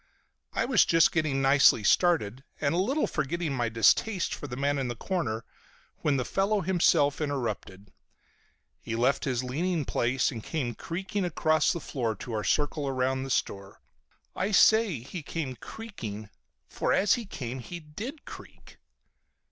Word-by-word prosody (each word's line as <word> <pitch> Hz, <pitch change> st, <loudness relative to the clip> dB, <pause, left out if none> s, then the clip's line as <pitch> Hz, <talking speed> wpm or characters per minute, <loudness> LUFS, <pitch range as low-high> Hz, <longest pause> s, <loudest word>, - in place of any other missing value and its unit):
I -, -, 0 dB
was 245 Hz, -7 st, +5 dB
just 165 Hz, -1 st, +4 dB
getting 150 Hz, -4 st, 0 dB
nicely 135 Hz, -5 st, +5 dB
started, 135 Hz, -, +2 dB, 0.2 s
and 145 Hz, 0 st, +1 dB
a 175 Hz, -, +1 dB
little 265 Hz, +11 st, +1 dB
forgetting 155 Hz, +1 st, -2 dB
my 120 Hz, -3 st, 0 dB
distaste 170 Hz, -, +2 dB
for 145 Hz, -, -6 dB
the 125 Hz, -, -6 dB
man 140 Hz, +1 st, 0 dB
in 135 Hz, -, -1 dB
the 120 Hz, -, -4 dB
corner, 115 Hz, -6 st, -3 dB, 0.5 s
when 145 Hz, -2 st, +1 dB
the 125 Hz, -, -1 dB
fellow 200 Hz, +1 st, +1 dB
himself 165 Hz, -5 st, +2 dB
interrupted. 115 Hz, -8 st, -4 dB, 0.9 s
He 115 Hz, -, -4 dB
left 125 Hz, +4 st, +1 dB
his 130 Hz, -2 st, -1 dB
leaning 160 Hz, +5 st, -1 dB
place, 125 Hz, +4 st, +1 dB
and 115 Hz, -5 st, -7 dB
came 130 Hz, -7 st, -3 dB
creaking 190 Hz, -, -4 dB
across 155 Hz, -3 st, +2 dB
the 170 Hz, -, -3 dB
floor 120 Hz, -7 st, -3 dB
to 115 Hz, +4 st, -7 dB
our 105 Hz, -1 st, -2 dB
circle 145 Hz, +2 st, 0 dB
around 130 Hz, 0 st, 0 dB
the 135 Hz, -, -5 dB
store. 100 Hz, -6 st, -2 dB, 0.6 s
I 195 Hz, -, -1 dB
say 215 Hz, -, +5 dB
he 140 Hz, +8 st, -7 dB
came 145 Hz, -3 st, -4 dB
"creaking" 110 Hz, -, -8 dB, 0.4 s
for -, -, -1 dB
as 200 Hz, -, +4 dB
he 240 Hz, -2 st, -2 dB
came 130 Hz, -7 st, -5 dB
he 175 Hz, +8 st, -7 dB
did 205 Hz, -, -8 dB
creak. -, -, -13 dB
145 Hz, 160 wpm, -28 LUFS, 125-175 Hz, 0.9 s, was